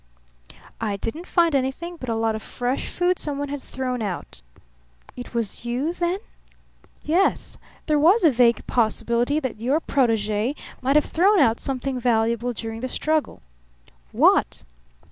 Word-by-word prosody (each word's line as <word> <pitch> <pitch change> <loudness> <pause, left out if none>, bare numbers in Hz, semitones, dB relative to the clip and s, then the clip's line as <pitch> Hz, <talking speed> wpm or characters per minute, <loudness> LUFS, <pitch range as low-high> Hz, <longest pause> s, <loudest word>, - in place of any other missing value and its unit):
"I 210 -3 -2
didn't 310 - -5
find 335 -2 +3
anything 275 +6 -1
but 255 -6 -7
a 225 - 0
lot 225 0 +1
of 220 - -5
fresh 250 +4 -3
food 360 0 0
someone 285 -1 -3
had 285 -1 -4
thrown 255 -2 -4
out." 195 -5 -5 0.7
"It 245 -1 -9
was 230 -2 -2
you, 250 +7 -1
then?" 350 +1 -1 0.9
"Yes. 345 +6 +1 0.3
There 300 -1 +2
was 360 +9 +5
a 315 - +7
vague 235 -1 +3
possibility 235 +4 +1
that 255 -7 -5
your 270 +6 +2
protege 225 -3 0 0.3
might 265 +2 +1
have 300 - +5
thrown 395 +5 +3
out 235 -8 +4
something 265 -1 -3
valuable 235 0 +1
during 225 -1 -6
the 255 - -3
struggle." 310 +3 -1 0.7
"What?" - - +3
255 Hz, 145 wpm, -23 LUFS, 230-305 Hz, 0.9 s, a